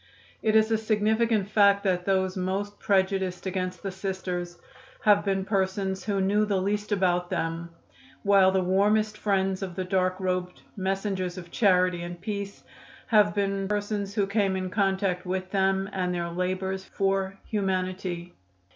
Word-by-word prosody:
It 220 -1 +2
is 220 0 +4
a 220 - +2
significant 220 -1 +1
fact 200 -1 +4
that 180 -2 0
those 190 -1 +1
most 195 +2 -3
prejudiced 190 -2 0
against 185 -1 -3
the 195 - -3
Sisters 185 -2 -4 0.5
have 205 -1 +5
been 195 -1 0
persons 190 -1 -1
who 200 -2 0
knew 200 +2 +2
the 205 -2 +1
least 205 +2 -2
about 180 -3 +1
them, 165 +1 -2 0.5
while 195 -2 +5
the 190 -1 +1
warmest 210 +3 +2
friends 195 -2 0
of 185 -3 -5
the 185 - -2
dark 185 0 0
robed 180 -1 -2
messengers 190 -1 -2
of 170 -1 -9
charity 180 -4 +3
and 175 0 -6
peace 200 +1 -5 0.5
have 210 -2 +4
been 195 -1 0
persons 205 -1 -2
who 205 - +2
came 200 -1 +1
in 185 -1 -3
contact 190 -2 0
with 185 0 -3
them 195 0 +1
and 180 -1 -1
their 170 -1 -2
labors 185 +2 -2
for 195 0 -1
humanity. 185 -3 -2
190 Hz, 155 wpm, -27 LUFS, 185-200 Hz, 0.5 s, have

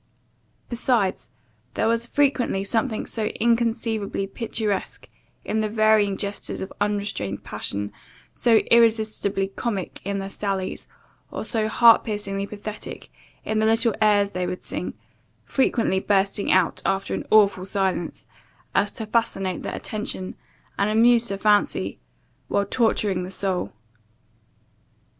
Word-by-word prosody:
Besides, 230 - 0 0.5
there 220 - +1
was 230 +1 +1
frequently 260 -8 +1
something 225 +2 -1
so 220 -2 -2
inconceivably 225 -3 0
picturesque 215 -1 -3 0.4
in 220 - -1
the 215 - -1
varying 215 -2 +3
gestures 200 0 -2
of 190 - -6
unrestrained 205 - -2
passion, 100 +1 -4 0.4
so 235 -2 +3 0.2
irresistibly 220 -4 +3
comic 200 -2 -4
in 200 +1 -2
their 195 0 -4
sallies, 195 -2 -3 0.4
or - - -5
so 220 -3 0
heart 230 +1 +6
piercingly 200 -2 -3
pathetic 210 +1 -7 0.3
in 215 0 0
the 220 - +2
little 225 0 +3
airs 205 -2 +4
they 180 -2 -2
would 180 - -5
sing, - - -4 0.5
frequently 230 -7 +1
bursting 200 0 +1
out 185 -2 +2
after 195 0 -1
an - - -2
awful 200 -4 +5
silence, 190 -3 -2 0.5
as 200 +1 +2
to 225 - -5
fascinate 200 -5 0
the - - -4
attention, 210 -3 -4 0.5
and 200 +1 +2
amuse 235 +2 +5
the 195 - -2
fancy, 205 0 +1 0.5
while 200 - +1
torturing 210 -4 +1
the 180 - -5
soul. 190 -1 -1
210 Hz, 125 wpm, -24 LUFS, 195-225 Hz, 0.5 s, heart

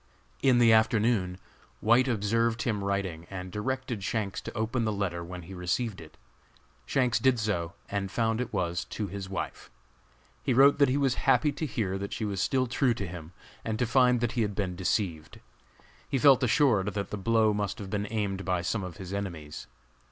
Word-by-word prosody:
In 130 -2 +4
the 115 -2 +6
afternoon, 110 -4 +2 0.4
White 120 +4 +4
observed 115 0 +1
him 105 -6 -1
writing 95 -4 -2
and 90 -1 -6
directed 120 0 -3
Shanks 100 -2 -2
to - - -8
open 115 +2 0
the 110 - 0
letter 95 -4 -2
when 90 +1 -8
he 95 - -10
received 95 +3 -2
it. 80 - -14 0.7
Shanks 125 -4 +2
did 130 +1 +3
so 95 -5 -1
and 100 -1 -2
found 110 +3 0
it 125 - -4
was 85 -3 -1
to 105 - -4
his 95 0 -6
wife. 95 - -5 0.7
He 130 - 0
wrote 140 +3 +6
that 140 -2 +5
he 130 - +1
was 135 -3 +2 0.2
happy 145 +4 +4
to 155 - -4
hear 95 -7 -2
that 100 0 -5
she 110 - -2
was 100 -2 -2
still 130 -2 +1
true 125 0 +1
to 105 - -4
him, 85 -1 -8 0.3
and 110 -1 -2
to 125 - +1
find 125 0 +3
that 120 -2 0
he 120 - -1
had 105 -2 -1
been 95 -3 -2
deceived. 90 -4 -2 0.7
He 140 - +1
felt 135 0 +6
assured 120 -5 +3
that 100 -2 -3
the - - -2
blow 110 +1 +3
must 105 -1 -2
have 100 -2 -7
been 105 0 -1
aimed 100 -3 -2
by 90 -2 -1
some 100 +3 -1
of 90 -1 -7
his 95 -1 -7
enemies. 85 -7 -5
105 Hz, 195 wpm, -28 LUFS, 95-120 Hz, 0.7 s, the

